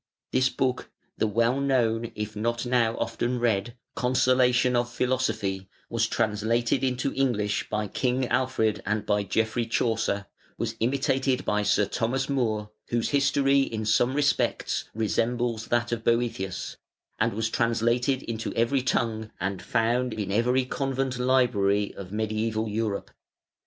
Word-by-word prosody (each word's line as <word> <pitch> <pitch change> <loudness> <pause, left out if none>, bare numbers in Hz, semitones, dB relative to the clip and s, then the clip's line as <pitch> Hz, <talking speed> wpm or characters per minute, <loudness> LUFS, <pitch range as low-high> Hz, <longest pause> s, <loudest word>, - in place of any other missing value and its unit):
This 130 0 +3
book, 130 -1 -1 0.3
the 110 - +2
well 115 +5 +2
known, 115 -4 +1
if 105 0 -4
not 115 +3 -1
now 120 -2 +2
often 125 +1 -1
read, 115 -1 0 0.2
"Consolation 125 0 +3
of 120 0 0
Philosophy", 110 -7 -1 0.2
was 115 -1 +1
translated 115 +3 0
into 130 +1 0
English 110 -7 0
by 105 0 -1
King 125 +4 0
Alfred 125 -4 +1
and 105 +1 -1
by 105 -1 +2
Geoffrey 110 +3 0
Chaucer, 110 -3 0 0.3
was 115 - -3
imitated 130 +2 +1
by 105 0 +1
Sir 105 0 +2
Thomas 125 +5 -1
More 110 -6 -1 0.2
(whose 120 -1 0
history 140 -1 +3
in 110 -5 -2
some 120 +4 +2
respects 145 0 +1
resembles 115 +1 0
that 120 0 0
of 115 -1 -2
Boëthius), 115 -5 -1 0.4
and - - +2
was 110 +1 -1
translated 120 +3 +1
into 115 -1 -4
every 120 +4 +2
tongue 110 -3 -1
and 95 +1 -2
found 120 +1 0
in 105 -3 -3
every 125 +5 +2
convent 135 -1 -2
library 115 -6 +2
of 95 -2 -9
mediæval 110 +1 -2
Europe. 110 -2 -2
115 Hz, 135 wpm, -26 LUFS, 110-125 Hz, 0.4 s, This